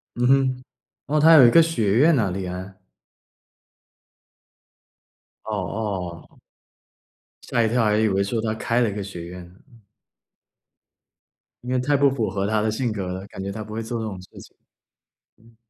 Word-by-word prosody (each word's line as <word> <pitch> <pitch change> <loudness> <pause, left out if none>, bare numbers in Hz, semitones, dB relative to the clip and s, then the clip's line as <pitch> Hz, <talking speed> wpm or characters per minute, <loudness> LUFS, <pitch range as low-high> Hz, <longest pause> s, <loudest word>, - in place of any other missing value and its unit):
嗯 125 +1 +1
哼， 130 -1 +2 0.4
哦， 150 +1 0
他 165 +2 +7
有 140 -6 +9
一 - - +4
个 165 - +7
学 115 -12 0
院 160 +2 +5
呐 105 -7 0
李 95 0 -4
安？ 95 +1 -7 2.7
哦， - - -6
哦。 95 -6 -5 1.0
吓 120 -2 0
一 110 - +1
跳， 120 0 +1
还 105 0 +2
以 110 0 +2
为 95 0 +1
说 110 +3 -2
他 110 -1 -2
开 115 +2 0
了 115 - +2
一 - - -5
个 105 - -5
学 90 -4 -8
院 90 0 -9
呢。 90 - -20 2.1
因 125 - -5
为 130 - +1
太 145 +3 +1
不 140 0 +4
符 120 -7 -2
合 100 +1 -2
他 110 0 +1
的 110 0 0
性 120 +1 -2
格 100 -3 -4
了， 95 +2 -5
感 95 - -9
觉 100 - -4
他 110 +1 -6
不 105 +1 -10
会 115 - -3
做 115 +1 -4
这 110 - -4
种 95 -4 -6
事 90 - -15
情。 - - -16 0.8
嗯。 115 0 -23
110 Hz, 195 characters per minute, -23 LUFS, 95-125 Hz, 2.7 s, 有